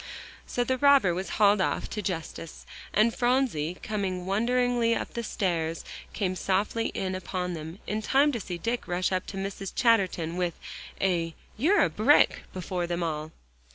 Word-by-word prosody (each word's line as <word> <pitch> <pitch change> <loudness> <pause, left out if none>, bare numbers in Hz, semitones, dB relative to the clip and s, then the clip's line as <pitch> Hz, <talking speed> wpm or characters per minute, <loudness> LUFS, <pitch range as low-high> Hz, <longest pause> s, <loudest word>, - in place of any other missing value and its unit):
So 245 - 0
the 260 +1 -1
robber 280 -10 +5
was 185 +2 -4
hauled 205 -1 +5
off - - 0
to 210 - -3
justice, 165 -3 -5 0.3
and 220 +2 +3
Phronsie, 240 - +1
coming 190 -4 -2
wonderingly 235 +3 +2
up - - -4
the 235 - -2
stairs, 170 -7 -2 0.3
came 185 -3 -1
softly 200 +5 0
in 190 -1 -2
upon 185 -1 -3
them, 160 +1 -7
in 215 +1 -2
time 275 +6 +3
to 240 - -3
see 180 -3 -5
Dick 230 +7 -2
rush 180 +2 0
up 185 -1 -1
to 195 - -6
Mrs. 195 0 -4
Chatterton 190 -9 +2
with 175 -2 -1 0.4
a 170 -4 0 0.2
"You're 340 - +4
a - - +2
brick!" - - +4
before 180 -1 -3
them 175 0 -2
all. 155 -1 -3
190 Hz, 165 wpm, -28 LUFS, 175-230 Hz, 0.4 s, robber